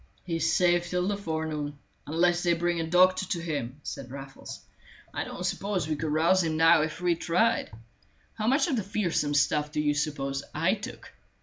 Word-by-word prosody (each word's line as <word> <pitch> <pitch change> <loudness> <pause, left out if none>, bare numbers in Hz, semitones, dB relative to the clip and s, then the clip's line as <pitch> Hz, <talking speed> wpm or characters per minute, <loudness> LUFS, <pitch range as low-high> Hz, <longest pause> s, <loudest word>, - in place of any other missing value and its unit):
"He 170 -2 -2
is 160 0 +1
safe 175 -1 +2
till 180 0 0
the 205 - 0
forenoon, 160 -5 -3 0.3
unless 175 +3 +2
they 175 -1 +3
bring 170 0 0
a 165 - -2
doctor 185 +2 +4
to 175 - -2
him," 145 -5 -4
said 130 -2 -6
Raffles. 135 +1 -9 0.5
"I - - -2
don't - - -6
suppose 195 -6 -1
we 155 - -1
could 155 +1 -3
rouse 170 +5 +4
him 160 -1 -1
now 165 0 +6
if 155 +2 -3
we 175 -1 +3
tried. 180 +7 +1 0.6
How 215 0 -3
much 275 +3 +3
of 280 -7 0
the - - +1
fearsome 175 -7 -1
stuff 150 +1 +2
do 155 - -2
you 150 -1 +2
suppose 140 -2 -2
I 165 +5 +2
took? 220 +4 -8
165 Hz, 195 wpm, -28 LUFS, 150-180 Hz, 0.6 s, now